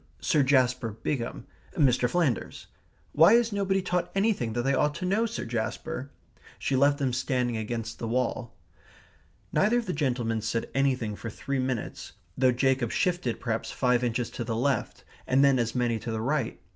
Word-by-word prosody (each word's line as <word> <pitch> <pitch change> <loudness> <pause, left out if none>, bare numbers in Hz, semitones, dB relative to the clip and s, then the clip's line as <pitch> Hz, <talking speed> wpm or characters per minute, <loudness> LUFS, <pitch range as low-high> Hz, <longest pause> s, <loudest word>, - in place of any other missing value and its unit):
Sir 155 -5 +2
Jasper 125 -4 +2
Bigham 115 +2 -4 0.3
Mr. 125 -4 +3
Flanders. 155 -6 -1 0.5
Why 165 +7 +6
is 235 -1 +4
nobody 195 -1 0
taught 180 -1 -1
anything 195 - +1
that 120 +1 -1
they 135 +2 +2
ought 150 +2 +1
to 180 - -4
know, 210 +5 +2
Sir 230 - -5
Jasper?" 120 +5 -4 0.5
She 135 - -1
left 140 +2 +4
them 135 -4 -1
standing 125 -2 0
against 115 +1 -4
the 115 - -3
wall. 120 0 -2 1.0
Neither 215 +4 +3
of 240 - -1
the 180 - -2
gentlemen 120 -6 -1
said 115 +1 -2
anything 130 -6 0
for 100 +3 -6
three 140 +4 -3
minutes, 130 -3 -3 0.2
though 130 -1 +4
Jacob 130 -1 +1
shifted 175 - 0
perhaps 115 -2 -2
five 125 -1 +1
inches 120 0 -1
to 120 - -4
the 115 -1 -3
left, 130 0 -1 0.2
and 135 +2 +4
then 135 -2 +4
as 115 0 -1
many 120 -2 +1
to 115 - -6
the 110 -1 -2
right. 130 -1 -1
130 Hz, 175 wpm, -27 LUFS, 115-150 Hz, 1.0 s, Why